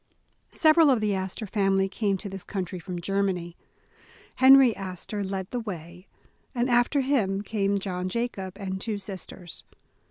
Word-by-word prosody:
SEVERAL 315 -1 +5
of 255 -4 +4
the 210 -1 0
Astor 190 +3 -3
family 195 -1 +1
came 200 0 -1
to 200 - -7
this 195 -1 -7
coun 190 -3 -3
try 180 +1 -7
from 175 +1 -6
Germany. 180 -2 -1 0.8
Henry 265 -2 +7
Astor 195 +2 -5
led 190 -1 -4
the 245 - -2
way, 180 -4 -8 0.5
and 245 +1 +1
after 245 +4 +3
him 210 -8 +1
came 200 -2 0
John 185 -2 -3
Jacob, 195 -4 -3
and 190 -2 -4
two 215 -1 -2
sis 195 -2 -7
ters. 175 -3 -9
195 Hz, 160 wpm, -26 LUFS, 190-225 Hz, 0.8 s, Henry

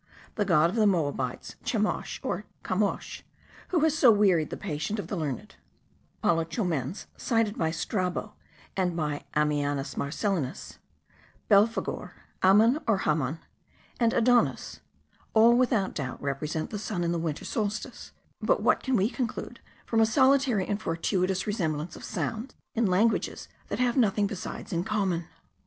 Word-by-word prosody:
The 210 - 0
god 170 -3 +4
of - - -6
the 215 -2 +5
Moabites, 145 -9 -1
Chemosh, 215 -3 -1
or - - -2 0.2
Camosch, - - -1 0.5
who 345 -4 +1
has 315 -1 +3
so 280 -6 +6
wearied 195 -8 +4
the - - -5
patience 170 +3 -3
of - - -5
the - - -2
learned; 150 -8 -4 0.7
Apollo 165 -1 +3
Chomens, 165 - -2
cited 225 -3 +1
by 160 - 0
Strabo 180 +3 -2 0.4
and 180 -3 0
by 150 -3 -2
Ammianus 145 -2 0
Marcellinus; 160 - -2 0.7
Belphegor; 210 +2 +2 0.3
Amun 220 +9 +5
or 220 -3 +3
Hamon; 155 0 0 0.6
and 230 -2 +3
Adonis: 240 +1 +2 0.6
all, 230 +2 +7
without 240 -6 +2
doubt, 130 -4 -4
represent 150 +3 -3
the 210 - -3
sun 195 -4 -3
in 170 - 0
the 170 - 0
winter 160 -2 -3
solstice; 215 +3 -3 0.3
but - - +2
what - - +3
can 260 -1 0
we 200 -2 +3
conclude 240 -1 -4 0.3
from 225 - +1
a - - +6
solitary 260 -4 +3
and 205 +1 -2
fortuitous 185 +2 0
resemblance 165 -6 -2
of - - -11
sounds 230 +4 -4 0.2
in 230 -2 +2
languages 210 +5 +1 0.2
that - - -3
have 245 -1 +1
nothing 210 -5 +3
besides 200 +1 -5
in 170 0 0
common? 190 -5 -1
195 Hz, 145 wpm, -28 LUFS, 160-225 Hz, 0.7 s, all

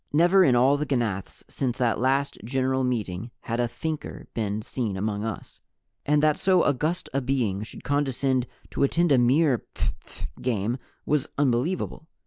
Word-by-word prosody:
Never 175 +5 +5
in 130 -8 +4
all 130 +4 +5
the 150 - -1
ganaths 110 -8 -2
since 125 -3 -2
that 120 -3 +1
last 135 +3 +1
General 130 +2 0
Meeting 115 -4 -2
had 115 +1 -3
a 120 - +2
Thinker 155 +5 -5
been 105 -1 -2
seen 110 -5 -3
among 105 +1 -2
us, 110 -3 -6 0.5
and 150 +1 +3
that 155 -1 +4
so 185 -2 +4
august 155 +6 0
a 140 - +1
being 120 -7 0
should 105 - -9
condescend 135 -3 +1 0.2
to - - -3
attend 165 +4 +3
a 135 - +6
mere 130 +1 +3
phph - - -5 0.2
game 120 0 -1 0.3
was 150 0 +1
unbelievable. 145 +5 0
130 Hz, 160 wpm, -26 LUFS, 115-145 Hz, 0.5 s, a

